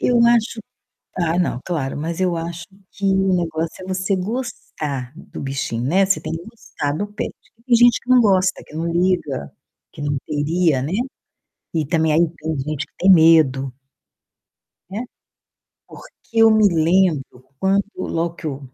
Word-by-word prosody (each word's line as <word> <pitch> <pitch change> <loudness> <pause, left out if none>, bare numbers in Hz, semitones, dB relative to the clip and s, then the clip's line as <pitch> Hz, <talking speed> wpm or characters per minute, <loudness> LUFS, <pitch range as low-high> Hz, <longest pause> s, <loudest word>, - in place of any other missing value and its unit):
eu 245 -1 +3
acho 235 -1 +2 0.6
ah, 170 -1 +1
não, 170 -8 0
claro, 145 -7 -2
mas 165 +3 -4
eu 180 -2 +1
acho 165 0 -5 0.3
que 200 - -5
o 190 -1 +3
negócio 165 0 -3
é - - -9
você 185 +1 0
gostar 180 - -4
do 175 - -10
bichinho, 135 -4 -3
né, 185 +9 +3
você 195 0 +1
tem - - -5
que 165 +1 -5
gostar 220 -10 -5
do 205 +7 -3
pet. 210 +1 -5 0.3
Tem 250 -2 +4
gente 240 0 +5
que - - -28
não 255 -1 +7
gosta, 190 -4 +2
que - - -14
não 165 +1 -2
liga, 170 - 0 0.4
que - - -14
não 145 0 -1
queria, 155 -1 +1
né, 145 - -3 0.8
e 160 -3 0
também 160 -1 +2
aí 155 - +4 0.2
tem 160 +1 -3
gente 145 +1 -3
que - - -40
tem 190 +2 +6
medo. 155 -6 +5 1.2
Né? 205 +5 -4 0.8
Porque - - -13 0.2
eu 225 0 +6
me 215 -1 +5
lembro 165 -6 +1
quando 195 +1 +2
logo 170 -2 -2
que 160 - -10
eu 140 -3 -3
170 Hz, 165 wpm, -20 LUFS, 150-195 Hz, 1.2 s, não